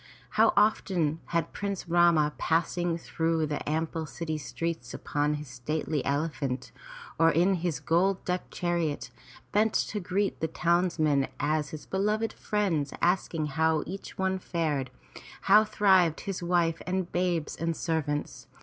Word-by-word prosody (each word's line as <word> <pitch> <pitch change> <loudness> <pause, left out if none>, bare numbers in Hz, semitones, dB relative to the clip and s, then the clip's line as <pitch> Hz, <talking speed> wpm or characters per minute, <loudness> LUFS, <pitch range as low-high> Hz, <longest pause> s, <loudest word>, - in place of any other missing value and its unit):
How - - +5
often 180 -7 +2
had 170 -1 -1
Prince 200 -3 -4
Rama, 170 -3 +4
passing 170 +1 +1
through 165 -1 0
the 150 -1 -3
ample 160 0 -2
city 155 -1 -4
streets 165 -4 -4
upon 145 +1 -1
his 150 0 -7
stately 145 +4 -2
elephant 140 -3 -2 0.5
or 165 0 +6
in 175 +5 +3
his 170 -6 -1
gold 180 +5 +1
decked 180 0 -2
chariot, 170 -4 -1 0.4
bent 215 +1 +2
to 210 - 0
greet 195 +2 -1
the 160 - 0
townsmen 160 -5 +2
as 150 0 -1
beloved 210 +3 0
friends, 180 -10 -1
asking 175 -3 +1
how 155 +1 +1
each 195 +3 -8
one 190 0 0
fared, 155 -8 -1 0.5
how 210 +2 +6
thrived 190 -6 +3
his 195 -3 -4
wife 170 -2 +1
and 185 -1 -1
babes 175 -3 0
and 165 0 -2
servants. 150 -3 -2
165 Hz, 135 wpm, -28 LUFS, 150-180 Hz, 0.5 s, or